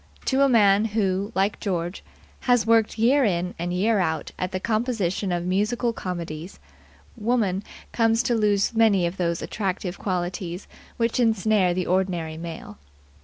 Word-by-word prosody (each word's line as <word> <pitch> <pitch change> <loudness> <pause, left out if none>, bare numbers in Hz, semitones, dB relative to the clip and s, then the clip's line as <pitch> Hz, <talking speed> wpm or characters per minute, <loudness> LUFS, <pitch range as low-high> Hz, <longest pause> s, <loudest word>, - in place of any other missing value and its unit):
To 265 0 +2
a 275 - +5
man 210 -3 +5
who, 200 -2 -1
like 195 +2 +1
George, 175 -2 -3 0.5
has 245 -4 +4
worked 225 -1 +3
year 260 +6 +4
in 180 -4 0
and 175 +1 -2
year 205 +4 +2
out 160 -3 -1
at 185 - -2
the 185 - -2
composition 215 -4 -1
of 175 0 -1
musical 210 +6 0
comedies, 170 -3 -6 0.6
woman 210 -4 0 0.3
comes 225 0 +2
to 240 - +1
lose 210 -2 +2
many 220 -5 +4
of 170 +3 -3
those 170 -2 -1
attractive 190 -2 -3
qualities 180 -1 -3 0.3
which 230 +1 0
ensnare 215 -5 +2
the 185 -1 -1
ordinary 180 -4 -1
male. 165 - -8
195 Hz, 150 wpm, -24 LUFS, 180-225 Hz, 0.6 s, a